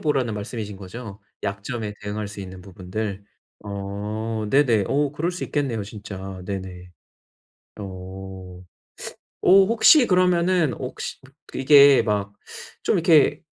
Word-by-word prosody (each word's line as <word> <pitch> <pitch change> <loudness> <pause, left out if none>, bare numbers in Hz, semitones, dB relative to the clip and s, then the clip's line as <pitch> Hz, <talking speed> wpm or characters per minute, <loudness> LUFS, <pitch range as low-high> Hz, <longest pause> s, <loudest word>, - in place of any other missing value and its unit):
보라는 135 -8 0
말씀이신 105 0 -6
거죠? 100 +2 -9 0.2
약점에 105 +2 -4
대응할 105 +1 -4
수 100 0 -9
있는 95 -1 -9
부분들. 100 +2 -5 0.4
어 105 +2 -4
네네. 120 -8 +3
어 145 0 +1
그럴 165 +4 -1
수 180 - -5
있겠네요, 130 -8 -2
진짜. 95 -2 -8
네네. 95 -2 -6 0.9
어. 95 -1 -9 0.8
어 195 +1 +6
혹시 235 +6 +6
그러면은 180 - +2
혹시 130 0 -6 0.4
이게 140 0 +7
막 100 -1 -1 0.5
좀 - - +2
이렇게 160 -3 +4
105 Hz, 235 characters per minute, -23 LUFS, 100-140 Hz, 0.9 s, 이게